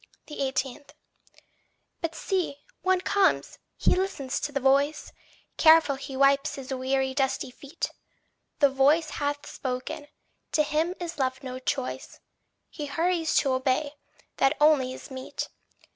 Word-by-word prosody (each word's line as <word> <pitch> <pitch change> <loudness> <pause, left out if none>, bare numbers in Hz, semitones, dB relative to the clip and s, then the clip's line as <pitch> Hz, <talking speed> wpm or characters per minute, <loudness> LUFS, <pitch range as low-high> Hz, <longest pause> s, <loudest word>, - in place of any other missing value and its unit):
18. 270 -2 -2 1.2
But 330 -1 -2
see, 365 -4 -1 0.3
one 375 -1 +2
comes; 395 0 +1 0.2
he - - +3
listens 365 -9 -2
to 295 - -3
the 280 - -1
voice; 280 +3 +2 0.4
Careful 320 -3 +6
he 270 0 -7
wipes 275 0 +3
his 270 -1 -6
weary 265 +1 0
dusty 265 -1 0
feet! 280 +4 -5 0.7
The 285 -2 +5
voice 290 +4 +3
hath 290 0 -1
spoken 255 +2 -5 0.5
to 305 - +4
him 310 +4 0
is 340 -3 -5
left 260 0 -1
no 255 -1 -5
choice; 260 0 -3 0.5
He 295 -3 -5
hurries 330 +2 0
to 275 - 0
obey 260 +3 0 0.4
that 270 +3 +3
only 295 -4 +4
is 260 - -10
meet. 260 0 -5
280 Hz, 130 wpm, -27 LUFS, 265-315 Hz, 1.2 s, Careful